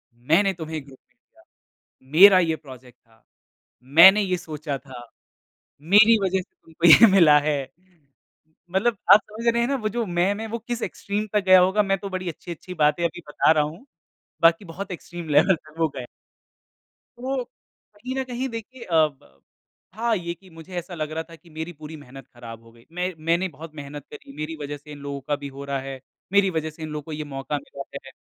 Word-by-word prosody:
"मैंने 160 +12 +2
तुम्हे 160 -2 -6
एक 145 - -8
ग्रुप 135 -2 -16
भेजा, - - -29 0.7
मेरा 190 +4 +8
ये 165 -3 +1
प्रोजेक्ट 130 -4 -14
था। 115 -1 -29 0.7
मैंने 190 +6 +9
ये 185 -2 0
सोचा 155 -4 -5
था। 130 -3 -12 0.8
मेरी 210 +8 +6
वज़ह 190 0 +1
से - - -20
तुमको 165 +1 0
ये 170 +8 +9
मिला 165 -6 +6
है।" 145 0 0 1.2
मतलब 215 +3 +1 0.2
आप 210 - +8
समझ 225 +2 -5
रहे 235 - +1
हैं 235 - +1
ना, 280 - +1
वो 215 -5 -2
जो 235 +2 -2
मैं, 175 +1 +1
मैं 220 +2 -5
वो 230 +2 -4
किस 235 +1 -5
एक्सट्रीम 205 +2 -3
तक 210 -1 +2
गया 185 -1 +8
होगा? 190 +3 +3
मैं 195 -1 0
तो 200 +1 -7
बड़ी 185 -1 -4
अच्छी-अच्छी 170 +2 -9
बातें 150 +3 +2
अभी 175 +1 -3
बता 150 - +3
रहा 155 -2 +3
हूँ। 160 - -8 0.6
बाकी 165 +4 +4
बहुत 190 +3 -8
एक्सट्रीम 175 -1 -8
लेवल 155 +6 +4
तक 155 -1 -19
वो 165 -1 +2
गया। 125 -2 -6 1.1
तो 260 +1 -3 0.5
कहीं 250 +5 -6
न - - 0
कहीं 255 +1 -4
देखिए 235 +2 -8
अ, 170 - -3
ब 100 - -20 0.5
हाँ, 230 +2 0
ये 170 -1 -4
कि 185 +2 -20
मुझे 165 +2 -12
ऐसा 175 +1 -6
लग 155 -2 -4
रहा 160 +1 -3
था 165 - -11
कि 170 +1 -21
मेरी 160 +2 -6
पूरी 155 0 -10
मेहनत 135 -2 -13
ख़राब 115 -2 -11
हो 115 - -18
गयी। 115 0 -21
मैं 180 +2 -3
मैंने 170 +3 +2
बहुत 155 +2 -10
मेहनत 145 -1 -8
करी। 140 -1 -12
मेरी 155 +2 -5
वज़ह 145 0 -5
से 145 +1 -15
इन 145 - -9
लोगों 140 0 -6
का 145 - +1
भी 145 0 -8
हो - - -6
रहा 140 -1 -2
है। 135 0 -7 0.3
मेरी 200 -1 +4
वज़ह 160 -3 -2
से 155 +1 -15
इन 155 - -5
लोगों 150 0 -5
को 160 - -10
ये 155 0 -4
मौक़ा 140 0 -4
मिला 140 -1 -9 0.2
है। - - -11
165 Hz, 210 wpm, -23 LUFS, 150-195 Hz, 1.2 s, मैंने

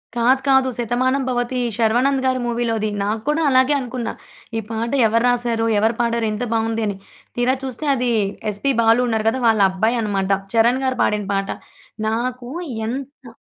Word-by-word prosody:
కాదు. 250 +3 +3
కాదు. 265 -1 +4
శతమానం 250 +3 0
భవతి 245 0 -1 0.2
శర్వానంద్ 245 +4 +2
గారి 255 0 +1
మూవీలోది. 230 -2 -1
నాకు 215 +2 -2
కూడా 305 +2 +1
అలాగే 260 +2 +4
అనుకున్న. 245 -2 -4 0.5
ఈ - - +1
పాట 230 +1 -3 0.2
ఎవరు 230 +2 +1
రాసారు? 240 -2 0
ఎవరు 220 +2 +2
పాడారు? 235 -1 0
ఎంత 210 - -3
బాగుంది! 225 0 0
అని. 200 - -2 0.4
తీరా 250 +2 +2
చూస్తే 265 +3 -5
అది 245 -1 0 0.4
ఎస్‌పీ 240 +7 0
బాలు 225 +2 +4
ఉన్నారు 220 -2 -1
కదా! 260 +3 -3
వాళ్ళబ్బాయి 215 +2 +2
అన్నమాట. 200 -2 -1 0.2
చరణ్ 235 +3 +3
గారు 260 0 0
పాడిన 210 -1 0
పాట. 195 0 -1 0.6
నాకు 245 +2 -2 0.4
ఎంత 270 +2 -6
235 Hz, 155 wpm, -20 LUFS, 225-255 Hz, 0.6 s, కాదు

